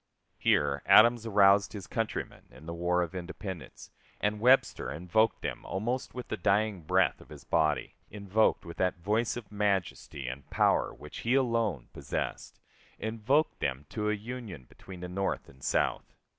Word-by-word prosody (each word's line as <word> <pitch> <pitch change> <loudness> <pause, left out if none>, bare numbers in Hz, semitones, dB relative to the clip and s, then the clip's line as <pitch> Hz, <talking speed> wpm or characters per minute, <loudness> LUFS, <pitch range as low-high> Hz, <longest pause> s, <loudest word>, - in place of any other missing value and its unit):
Here - - +2
Adams 115 +1 +6
aroused 100 -1 +5
his 100 -3 -7
countrymen 115 -1 -4
in 80 - -15
the 85 - -5
War 90 +1 +1
of 85 - -6
Independence, 90 -1 -7 0.3
and 105 0 0
Webster 125 +4 +3
invoked 90 +8 +1
them - - -4
almost 120 +8 -3
with 125 - -6
the - - -2
dying 100 +1 +1
breath 75 - +2
of - - -16
his - - -11
body 80 -3 +1 0.2
invoked 105 +1 +1
with 85 - -9
that 90 -1 +1
voice 105 +7 0
of 110 -5 -9
majesty 100 -9 -1
and 65 +2 -7
power - - +2
which - - -10
he 120 +3 +1
alone 115 - 0
possessed - - -5 0.4
invoked 115 +8 0
them 65 +3 -2
to 105 -1 -2
a - - +2
union 110 - -7
between 90 +7 -12
the 90 - -4
North 95 +2 -2
and 70 0 -17
South. - - 0
100 Hz, 160 wpm, -30 LUFS, 90-110 Hz, 0.4 s, Adams